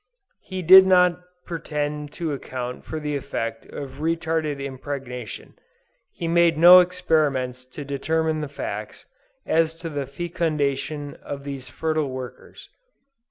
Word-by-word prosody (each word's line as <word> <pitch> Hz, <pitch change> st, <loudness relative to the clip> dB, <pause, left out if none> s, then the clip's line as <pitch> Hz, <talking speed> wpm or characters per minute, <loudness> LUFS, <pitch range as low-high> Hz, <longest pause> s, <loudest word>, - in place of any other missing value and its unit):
He 185 Hz, -1 st, -6 dB
did 190 Hz, +3 st, +9 dB
not 180 Hz, -2 st, +4 dB, 0.3 s
pretend 150 Hz, -3 st, -3 dB
to 165 Hz, -3 st, -3 dB
account 125 Hz, -2 st, -6 dB
for 160 Hz, -, -4 dB
the 150 Hz, -1 st, -3 dB
effect 115 Hz, -5 st, -4 dB
of 135 Hz, -1 st, -8 dB
retarded 160 Hz, -2 st, -1 dB
impregnation; 130 Hz, -3 st, -6 dB, 0.7 s
and 165 Hz, -1 st, -1 dB
made 170 Hz, -2 st, +4 dB
no 175 Hz, +3 st, +10 dB
experiments 150 Hz, -8 st, +1 dB
to 135 Hz, +3 st, -9 dB
determine 160 Hz, +3 st, 0 dB
the 150 Hz, -, -3 dB
facts, 145 Hz, -, -6 dB, 0.4 s
as 160 Hz, 0 st, +2 dB
to 165 Hz, 0 st, -6 dB
the 140 Hz, -2 st, -3 dB
fecundation 145 Hz, -2 st, -2 dB
of 140 Hz, -1 st, -6 dB
these 135 Hz, -2 st, -7 dB
fertile 155 Hz, 0 st, -1 dB
workers. 130 Hz, -1 st, -9 dB
150 Hz, 125 wpm, -24 LUFS, 140-165 Hz, 0.7 s, no